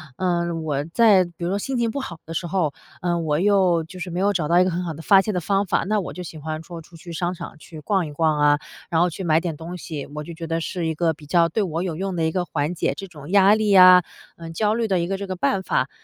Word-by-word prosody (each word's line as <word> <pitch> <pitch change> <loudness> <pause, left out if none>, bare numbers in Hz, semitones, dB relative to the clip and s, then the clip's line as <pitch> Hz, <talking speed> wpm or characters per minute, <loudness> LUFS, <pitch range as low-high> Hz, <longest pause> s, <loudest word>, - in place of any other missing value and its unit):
呃， 170 -2 0
我 150 -3 -2
在 210 -6 +5
比 175 - -12
如 175 - -1
说 200 - -1
心 265 +4 -3
情 235 -2 0
不 280 - -3
好 180 -11 -6
的 165 - -7
时 170 +1 -3
候， 170 -5 0 0.3
呃， 175 -1 0
我 155 -3 0
又 185 -2 +3
就 180 +3 -11
是 180 0 -5
没 175 +2 -3
有 200 +1 +3
找 170 -6 -1
到 175 +2 +4
一 - - +6
个 185 - 0
很 175 +1 -2
好 165 - -3
的 160 - -9
发 195 +3 +6
泄 210 +2 -3
的 180 - -1
方 195 +3 +1
法， - - 0
那 210 +3 +1
我 185 - -5
就 180 - -7
喜 165 -2 -9
欢 155 +1 -5
说 170 -1 -9
出 165 +1 -17
去 170 +1 -11
商 175 +2 -2
场 165 - -9
去 155 0 -12
逛 190 0 0
一 150 - -9
逛 155 0 +1
啊， 145 0 +4 0.3
然 165 -1 +2
后 180 - +3
去 180 +2 -6
买 160 0 +3
点 165 -4 -4
东 170 +2 -7
西， 155 -4 -6
我 150 - -4
就 170 - -8
觉 165 0 -7
得 165 0 -1
是 170 0 -3
一 160 - -2
个 165 +1 +1
比 150 -1 -15
较 170 +2 +3
对 210 +7 -1
我 170 -2 -2
有 170 -4 -3
用 190 0 -3
的 165 - -1
一 160 - 0
个 180 +1 -1
缓 150 0 -2
解 175 - -1
这 195 - -7
种 150 -4 -12
压 200 +1 +6
力 215 -2 +1
啊， 185 -1 +8 0.3
呃， 165 -1 -9
焦 210 +5 +1
虑 230 0 0
的 190 -3 +1
一 170 - -2
个 195 - -2
这 200 0 -6
个 185 - -3
办 180 +3 0
法。 140 -6 0
175 Hz, 325 characters per minute, -22 LUFS, 160-190 Hz, 0.3 s, 啊